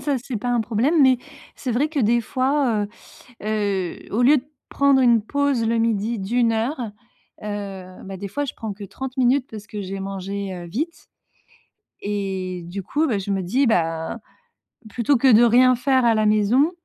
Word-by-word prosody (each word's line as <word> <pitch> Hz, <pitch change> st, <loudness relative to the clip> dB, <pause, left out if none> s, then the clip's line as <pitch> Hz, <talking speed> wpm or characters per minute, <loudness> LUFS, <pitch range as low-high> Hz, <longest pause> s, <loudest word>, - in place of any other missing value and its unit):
ça 285 Hz, -2 st, 0 dB
c'est 255 Hz, -3 st, -4 dB
pas 245 Hz, -, -4 dB
un 240 Hz, -1 st, +2 dB
problème. 245 Hz, +8 st, +2 dB
Mais 260 Hz, -2 st, +5 dB, 0.4 s
c'est 255 Hz, -, -3 dB
vrai 270 Hz, +6 st, +1 dB
que 310 Hz, -1 st, -4 dB
des 235 Hz, +1 st, +3 dB
fois, 255 Hz, -3 st, 0 dB, 0.6 s
heu -, -, -7 dB
heu, 200 Hz, -4 st, -1 dB
au 225 Hz, +4 st, +1 dB
lieu 285 Hz, +5 st, +6 dB
de 250 Hz, -, -10 dB, 0.2 s
prendre 280 Hz, -1 st, +3 dB
une 235 Hz, -3 st, +4 dB
pause 280 Hz, -1 st, 0 dB
le 230 Hz, +1 st, +1 dB
midi 225 Hz, 0 st, 0 dB
d'1 230 Hz, +4 st, +1 dB
heure. 240 Hz, +6 st, -1 dB, 0.6 s
Heu, 195 Hz, -3 st, -6 dB
bah 195 Hz, 0 st, -7 dB
des 200 Hz, -, -5 dB
fois 290 Hz, +9 st, -2 dB
je 275 Hz, -, -5 dB
prends 220 Hz, -2 st, -5 dB
que 200 Hz, +1 st, -9 dB
30 265 Hz, +6 st, -7 dB
minutes 260 Hz, +1 st, +2 dB
parce 210 Hz, -2 st, -9 dB
que 210 Hz, 0 st, -6 dB
j'ai 195 Hz, 0 st, -5 dB
mangé, 195 Hz, 0 st, -4 dB
heu, 175 Hz, -1 st, -7 dB
vite. 305 Hz, -, -5 dB, 1.0 s
Et, 190 Hz, -3 st, -3 dB
du 190 Hz, +3 st, -5 dB
coup, 300 Hz, -, 0 dB
bah, 220 Hz, -7 st, 0 dB
je 195 Hz, +1 st, -5 dB
me 195 Hz, -1 st, 0 dB
dis, 250 Hz, +10 st, +1 dB
ben: 165 Hz, +1 st, 0 dB, 0.7 s
«Plutôt 245 Hz, +6 st, +2 dB
que 255 Hz, +1 st, +5 dB
de 225 Hz, +2 st, +7 dB
rien 250 Hz, +2 st, +6 dB
faire 260 Hz, +1 st, +2 dB
à 230 Hz, -1 st, +4 dB
la 215 Hz, -1 st, +2 dB
maison, 215 Hz, +8 st, +3 dB
225 Hz, 190 wpm, -22 LUFS, 200-260 Hz, 1.0 s, de